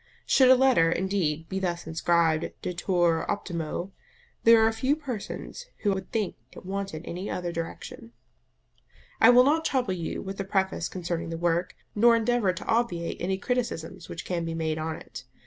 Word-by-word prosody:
Should 260 -2 +5
a 260 - +9
letter, 250 -11 +4
indeed, 170 -4 -1
be 190 +2 -3
thus 175 -2 -2
inscribed, 165 0 +1
DETUR 175 -2 +1
OPTIMO, 175 -2 -3 0.5
there 230 -1 +7
are 225 - +3
few 260 +6 +1
persons 285 - -6 0.2
who 205 -2 +3
would 190 - -6
think 215 -4 -2 0.2
it - - -12
wanted 195 -4 -4
any 180 +4 -5
other 175 -1 -3
direction. 165 -8 -7 1.1
I 225 - +7
will 245 +1 +8
not 310 +4 +2
trouble 255 -10 0
you 170 -3 -4
with 195 0 -6
a - - 0
preface 190 -3 -1
concerning 170 -2 -4
the 165 - -4
work, 175 +1 0 0.2
nor 230 +2 +5
endeavour 230 -3 +2
to 180 - -8
obviate 225 -8 0
any 190 +2 0
criticisms 190 -7 -3
which 165 - -6
can 175 -2 -2
be 165 0 -3
made 160 -1 -1
on 160 0 -3
it. - - -10
185 Hz, 170 wpm, -27 LUFS, 165-225 Hz, 1.1 s, a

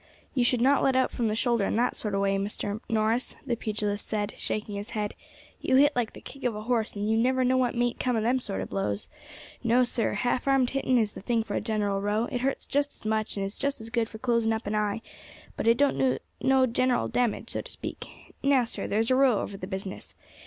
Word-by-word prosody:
"You 255 - +2
should 240 0 +2
not 275 +3 +4
let 265 - +3
out 260 0 +3
from 235 - -1
the 215 - 0
shoulder 235 -2 +2
in - - -1
that 240 +2 +1
sort 210 -2 -2
of 195 - +1
way, 195 0 +2
Mr. 205 +1 -2
Norris," 225 +2 +1
the 235 - 0
pugilist 210 -2 -2
said, 205 -1 -2
shaking 210 0 -3
his 200 +1 -5
head; 210 -1 -1 0.5
"you 260 - +2
hit 290 +2 +5
like 240 -3 -1
the - - -11
kick 275 0 -11
of 245 -3 0
a 210 - -5
horse, 230 -2 0
and 205 +1 -2
you 220 - +2
never 255 +3 +2
know 255 +1 +3
what 255 -1 +1
mayn't 240 0 0
come 250 -2 +1
of 220 - 0
them 250 +3 +2
sort 95 - -4
of 95 - -5
blows. 100 +1 -2 0.5
No, 240 +2 +4
sir; 240 -1 0
half 245 +1 0
armed 270 -2 +3
hitting 265 -2 +2
is 215 -3 +1
the - - -8
thing 230 +2 +1
for 205 - -6
a - - 0
general 205 -3 0
row; 210 +2 +1
it 245 -3 -2
hurts 270 +1 -1
just 285 0 0
as - - -13
much, 215 -1 0
and 195 - -1
is 195 - -5
just 280 -1 -1
as 225 0 -8
good 230 -2 0
for 220 - -9
closing 230 -1 +1
up 220 +1 -3
an 205 - -2
eye, 210 +1 0 0.5
but - - -2
it 230 +1 +5
don't 285 0 +2
do 260 -1 +3 0.2
no 265 -1 +4
general 250 0 +1
damage, 245 -3 -1
so - - -2
to - - -12
speak. - - -6 0.3
Now, 275 -2 +4
sir, 230 - -3
there's 225 +4 +1
a - - +5
row 260 -5 +4
over 200 - -5
the 185 -1 -6
business. 190 0 -6
230 Hz, 250 wpm, -27 LUFS, 210-255 Hz, 0.5 s, hit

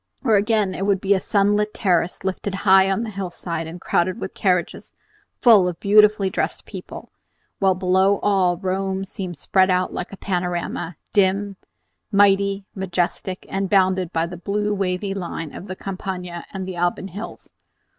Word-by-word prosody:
Or 225 -5 +4
again 205 -1 +2
it 195 +2 -3
would 200 -2 +2
be 195 +1 +2
a 195 - +2
sunlit 205 +2 +1
terrace 180 -3 0
lifted 190 +1 -3
high 190 0 +6
on 195 +4 0
a 220 - -6
hillside, 175 -4 -4
and 170 +2 -8
crowded 180 +5 0
with 190 - -5
carriages 180 -3 -1 0.4
full 215 -7 +6
of 175 -2 -4
beautifully 210 0 +5
dressed 190 - -2
people, - - -9 0.5
while 190 -1 +3
below 190 +2 +3
all 185 -4 +2
Rome 190 +1 -2
seemed 185 -3 -6
spread 185 +5 +2
out 185 0 +1
like 180 - -5
a 195 - -9
panorama, 175 -3 -3 0.2
dim, 200 0 +2 0.6
mighty, 200 -1 +3
majestic, 185 0 -2
and 195 0 -2
bounded 185 -3 +2
by 165 0 0
the 175 +1 -7
blue 205 +4 -1
wavy 195 0 -1
line 170 -5 -5
of 195 - -9
the 185 - -5
Campagna 185 -3 -6
and 190 -1 -5
the 185 - -5
Alban 175 +2 -1
hills. 200 +5 -9
190 Hz, 165 wpm, -22 LUFS, 180-200 Hz, 0.6 s, high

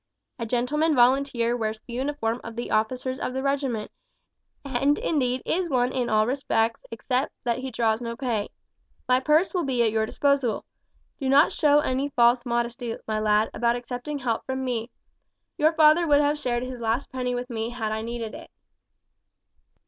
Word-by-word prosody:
A 230 - -3
gentleman 295 +7 +1
volunteer 245 -1 +3
wears 220 -2 -2
the 240 - -9
uniform 250 -3 -2
of 230 0 -8
the 240 - -5
officers 255 +4 -1
of 255 - -3
the 265 - -2
regiment, 275 -6 -1 0.7
and 275 +2 +1
indeed 255 -5 0
is 350 0 0
one 250 -2 +1
in 250 -2 -1
all 215 0 +3
respects 230 -3 0
except 250 +4 -1
that 240 0 0
he 260 +1 -4
draws 225 -1 0
no 235 -1 -5
pay. 230 -6 -2 0.6
My 255 0 +4
purse 305 +7 +2
will 360 -2 0
be 255 -4 +1
at 225 - +2
your 220 0 0
disposal. 280 -4 0 0.5
Do 270 -3 -1
not 285 +4 +5
show 295 -1 +4
any 275 -1 -1
false 240 -1 +3
modesty, 235 0 -2
my 215 -1 -1
lad, 215 0 +2
about 235 0 +1
accepting 245 +4 -5
help 240 -4 -2
from 260 0 -3
me. 235 -2 -2 0.7
Your 310 +2 +3
father 320 +2 +5
would 290 -1 +5
have 295 0 +1
shared 245 -3 -1
his 255 -1 -6
last 230 +4 -1
penny 250 -1 -2
with 245 +1 -5
me 225 0 -2
had 225 -3 -3
I 220 0 -2
needed 230 -1 -5
it." - - -10
250 Hz, 180 wpm, -25 LUFS, 230-275 Hz, 0.7 s, not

